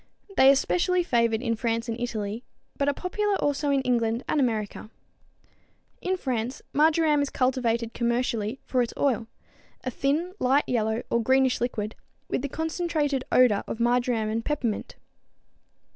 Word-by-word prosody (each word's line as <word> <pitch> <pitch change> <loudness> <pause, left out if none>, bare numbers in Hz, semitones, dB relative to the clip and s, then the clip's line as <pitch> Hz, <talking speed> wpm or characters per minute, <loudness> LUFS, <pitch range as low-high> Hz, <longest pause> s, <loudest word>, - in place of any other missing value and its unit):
They 265 -4 +7
are 275 - +7
specially 360 +5 +1
favored 235 -5 +1
in 230 -2 0
France 230 0 -1
and 230 - -2
Italy, 220 -1 -3 0.3
but 280 - -1
are - - +1
popular 410 +3 -1
also 290 -3 0
in 275 -1 +2
England 235 -1 0
and 305 - +1
America. 220 -4 -1 1.1
In 375 +1 -1
France 250 -5 -3
marjoram 305 0 +3
is 285 - -1
cultivated 235 -3 0
commercially 235 -1 -1
for 255 - +1
its 240 - -2
oil, 240 -5 +1 0.6
a 255 - -2
thin, 300 +9 -1
light 270 +3 +3
yellow 220 -1 0
or 235 - +2
greenish 260 +2 +2
liquid, 220 -3 -2 0.3
with - - -1
the 285 - -3
concentrated 315 -3 -1
odor 245 -5 +4
of 225 - -5
marjoram 240 -2 +1
and 225 +1 -2
peppermint. 245 -7 -2
250 Hz, 150 wpm, -26 LUFS, 230-285 Hz, 1.1 s, They